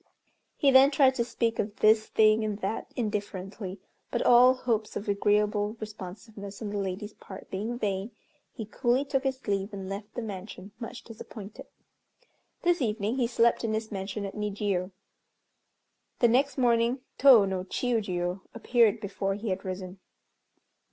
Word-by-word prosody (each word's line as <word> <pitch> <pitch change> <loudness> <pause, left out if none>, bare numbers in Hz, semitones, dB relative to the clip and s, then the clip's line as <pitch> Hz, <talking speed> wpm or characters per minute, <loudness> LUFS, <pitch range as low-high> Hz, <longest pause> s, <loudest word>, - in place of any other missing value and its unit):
He 280 - +4
then 265 +1 +8
tried 270 -2 +4
to 240 - 0
speak 230 -1 -1
of 205 0 -2
this 215 0 +4
thing 215 0 +4
and 210 -2 -2
that 195 +3 -3
indifferently, 200 -3 -4 0.3
but - - -1
all 250 +2 +7
hopes 225 -4 -2
of 205 - -5
agreeable 205 +1 +1
responsiveness 205 0 -8
on 215 - -4
the 205 - -2
lady's 200 +2 -4
part 190 - -12
being 215 +5 -3
vain, 200 -2 -2 0.4
he 225 - -7
coolly 245 +5 0
took 275 -1 -1
his 265 -1 -3
leave, 200 0 -1
and 195 -1 -6
left 200 +2 -7
the 240 - -3
mansion, 195 -1 -8
much 230 - -7
disappointed. 215 -2 -10 1.0
This 350 -2 +2
evening 220 0 -1
he 245 -3 +2
slept 235 0 +2
in 220 -1 0
his 220 0 -4
mansion 200 +1 -4
at 195 - -6
Nijiô. 205 -3 -2 1.3
The 240 - +4
next 265 +4 +2
morning 240 0 +2 0.2
Tô 250 -7 +8
no 190 -1 -2
Chiûjiô 190 -5 -1
appeared 230 -2 +3
before 195 -1 -2
he 215 +2 -4
had 190 0 -2
risen. 185 0 -6
215 Hz, 155 wpm, -28 LUFS, 195-235 Hz, 1.3 s, then